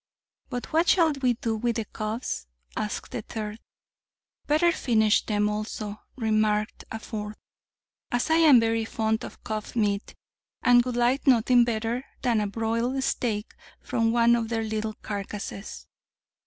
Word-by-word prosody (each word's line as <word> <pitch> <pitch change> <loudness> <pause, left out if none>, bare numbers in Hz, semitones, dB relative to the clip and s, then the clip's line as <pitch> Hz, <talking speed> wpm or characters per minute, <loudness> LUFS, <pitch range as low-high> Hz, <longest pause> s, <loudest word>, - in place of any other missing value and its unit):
But 245 +4 -5
what 330 +2 +3
shall 335 -4 +5
we 265 -4 +1
do 225 -1 -2
with 235 +1 -1
the 225 -2 -2
cubs? 215 - -4 0.3
asked 210 - -4
the 235 - -3
third. 215 0 -6 0.9
Better 310 +4 +4
finish 220 -8 +2
them 210 -1 +1
also, 210 0 -4
remarked 215 -2 0
a 220 - -3
fourth, 210 -1 -6 0.7
as 245 +6 0
I 320 - +5
am 305 -7 +7
very 225 0 +1
fond 220 0 -1
of - - -10
cub 215 +1 -5
meat, 205 -3 0 0.5
and 245 -1 +6
would 250 -1 -3
like 245 +4 +1
nothing 245 -1 +5
better 235 +2 -1 0.2
than 230 -3 +2
a 210 - 0
broiled 230 +5 -1
steak 220 -5 -1 0.3
from 225 -1 0
one 235 0 +5
of 230 -1 -2
their 225 -1 -1
little 215 0 -3
carcasses. 200 0 -6
225 Hz, 150 wpm, -26 LUFS, 215-245 Hz, 0.9 s, am